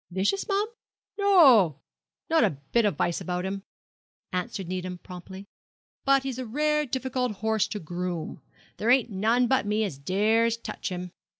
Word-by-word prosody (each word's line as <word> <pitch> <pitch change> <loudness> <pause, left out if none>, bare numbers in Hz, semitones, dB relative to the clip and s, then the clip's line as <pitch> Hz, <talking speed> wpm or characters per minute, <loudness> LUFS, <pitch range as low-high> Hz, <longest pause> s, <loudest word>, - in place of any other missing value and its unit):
'Vicious, 190 - 0
mum? 405 +1 +1 0.5
no, 265 - +6 0.5
not 325 0 +3
a 145 - +1
bit 235 -2 +3
of 205 - +1
vice 170 - -1
about 180 0 -3
him,' 195 +1 -3 0.7
answered 190 0 -3
Needham 185 0 -4
promptly, 185 +2 -10 0.6
'but 275 -1 +4
he's 265 -2 -4
a 255 - -3
rare 300 +4 +1
difficult 255 -2 -2
horse 220 +1 0
to 210 - -5
groom. 175 -1 -5 0.4
There 220 - -1
ain't 245 -2 +4
none 225 +6 +2
but 260 -3 +1
me 210 +1 +1
as 170 -10 -4
dares 220 +8 +2
touch 230 - -5
him. 180 -1 -5
215 Hz, 160 wpm, -27 LUFS, 185-255 Hz, 0.7 s, no